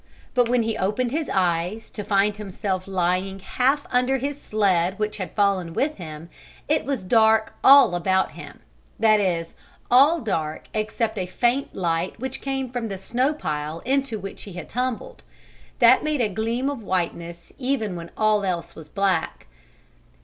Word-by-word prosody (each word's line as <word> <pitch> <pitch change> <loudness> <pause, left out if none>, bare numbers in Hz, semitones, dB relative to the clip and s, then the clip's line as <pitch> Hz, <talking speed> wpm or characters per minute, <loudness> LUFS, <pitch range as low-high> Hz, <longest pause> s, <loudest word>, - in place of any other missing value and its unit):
But 245 -2 +2
when 245 -1 +2
he 225 0 -1
opened 215 +6 0
his 310 +2 -2
eyes, 180 +3 -1
to 210 - -5
find 200 +1 +2
himself 195 -2 -4
lying 185 +1 0
half 260 +8 0
under 250 +2 +2
his 280 +2 -4
sled 190 -3 +1
which 215 0 -2
had 185 -5 -5
fallen 195 -5 +1
with 300 +2 0
him, 160 -2 -8 0.4
it 305 +1 +1
was 275 -7 -2
dark 220 +2 +3
all 275 -8 +8
about 190 +2 +1
him - - -11 0.4
that 215 -1 +5
is, 170 -4 -1 0.4
all 285 +7 +6
dark 160 - -3
except 220 0 -2
a 180 - -2
faint 240 +8 0
light 170 +2 -1
which 265 +1 -4
came 270 -2 -3
from 245 -2 -3
the 195 -2 -5
snow 245 +8 0
pile 155 - -4
into 270 -3 0
which 195 -1 -7
he 200 - -9
had 175 -2 -7
tumbled. 250 0 -3 0.6
That 240 +1 +6
made 305 -3 0
a 220 - +2
gleam 230 +6 -1
of 280 -4 -3
whiteness 170 -3 -3
even 250 -7 -1
when 170 0 -7
all 215 -1 +2
else 180 -3 -2
was 155 -2 -12
black. 190 -2 -1
210 Hz, 165 wpm, -24 LUFS, 185-250 Hz, 0.6 s, all